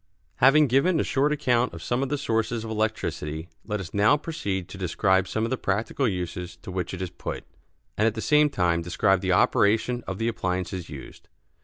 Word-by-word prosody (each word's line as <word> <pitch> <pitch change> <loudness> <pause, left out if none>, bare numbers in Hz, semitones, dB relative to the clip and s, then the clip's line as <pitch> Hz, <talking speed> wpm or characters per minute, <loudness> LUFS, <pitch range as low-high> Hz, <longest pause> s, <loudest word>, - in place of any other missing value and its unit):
Having 140 +4 +6
given 145 +7 +3
a - - +2
short 140 +2 +1
account 125 - +1
of 85 - -9
some 120 +1 -1
of 135 - -1
the 145 - 0
sources 115 -3 -1
of 110 - -6
electricity, 90 -7 -2
let 105 -1 -3
us 90 -3 -8
now 105 +8 +4
proceed 120 - -4
to 95 - -9
describe 95 +1 +1
some 110 +3 -2
of 115 - -1
the 130 - -1
practical 115 +7 0
uses 90 -3 -4
to - - -7
which 90 -2 -3
it 95 - -5
is 90 - -5
put, - - -6 0.6
and 110 - +4
at 110 - 0
the - - -4
same 150 +4 +4
time 85 -9 +1
describe 90 +2 +1
the 95 - 0
operation 110 +6 +2
of 95 - -4
the 115 - -1
appliances 90 -5 -3
used. 70 -3 -11
105 Hz, 205 wpm, -26 LUFS, 90-125 Hz, 0.6 s, Having